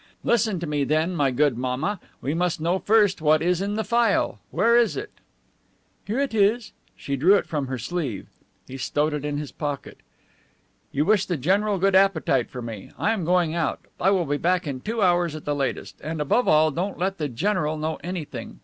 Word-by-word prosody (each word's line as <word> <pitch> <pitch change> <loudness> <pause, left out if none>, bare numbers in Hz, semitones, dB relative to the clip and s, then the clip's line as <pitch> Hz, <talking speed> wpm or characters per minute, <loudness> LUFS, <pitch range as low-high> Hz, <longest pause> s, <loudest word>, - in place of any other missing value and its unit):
Listen 220 -5 +1
to 170 - -4
me, 150 -2 -1
then, 155 +5 0
my 145 -4 +2
good 130 -1 +1
mamma. 130 +11 -2 0.2
We 140 - -1
must 175 0 0
know 170 +4 0
first 205 -4 +3
what 155 0 +3
is 180 +1 +1
in 200 +1 -2
the 220 - -1
phial. 235 -3 +1
Where 235 +1 +3
is 235 -2 +3
it?" 420 +1 -5 1.0
"Here 215 +4 -2
it 275 -4 -1
is." 220 +2 +2 0.3
She 140 - -3
drew 170 +9 +5
it - - +1
from 145 -4 -3
her 130 0 -3
sleeve. 135 - -4 0.4
He 130 - -8
stowed 150 +4 0
it 150 -1 -3
in 145 -1 -2
his 145 -3 -5
pocket. 145 -2 -5 0.9
"You 145 +2 0
wish 205 -1 +3
the 175 - -1
general 200 +9 +1
a - - -3
good 195 +1 +2
appetite, 190 -10 +3
for 125 -2 -7
me. 110 -4 -7
I 220 - +1
am 205 -6 -3
going 175 -2 +2
out. 170 -1 -1 0.2
I 190 - +3
will 190 -3 +2
be 145 0 -1
back 180 +3 +1
in 135 -3 -4
two 225 - -1
hours 175 -3 +2
at 155 - -9
the 145 - 0
latest. 140 -2 -3
And, 160 0 -4
above 150 - +1
all, 155 0 +4
don't 180 +7 -3
let 190 +1 -2
the 150 -2 -1
general 155 - -1
know 155 +1 -3
anything. 175 -3 -6
170 Hz, 215 wpm, -24 LUFS, 145-195 Hz, 1.0 s, drew